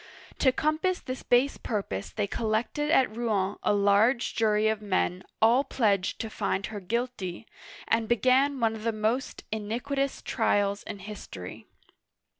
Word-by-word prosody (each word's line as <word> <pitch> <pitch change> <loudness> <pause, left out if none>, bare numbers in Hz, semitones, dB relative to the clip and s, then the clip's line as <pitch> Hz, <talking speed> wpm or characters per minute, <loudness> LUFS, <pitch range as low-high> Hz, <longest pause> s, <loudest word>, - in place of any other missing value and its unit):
To 260 - +5
compass 310 +7 0
this 255 0 -6
base 250 +3 +2
purpose 195 - -3
they 210 - -2
collected 225 +8 -1
at 265 -8 +3
Rouen 205 -5 0
a - - +2
large 205 +5 +3
jury 215 -1 +2
of 220 -1 0
men, 185 -3 0 0.2
all 240 +5 +5
pledged 205 -8 +1
to 225 - -4
find 195 -1 -1
her 210 -2 -6
guilty, 225 -2 -3 0.4
and 225 -1 +1
began 260 +3 +3
one 225 -2 +2
of 220 -1 -8
the 230 - +1
most 220 +5 -1
iniquitous 245 +6 -2
trials 205 -3 +1
in 215 - -7
history. 185 - -9
220 Hz, 145 wpm, -28 LUFS, 205-255 Hz, 0.4 s, To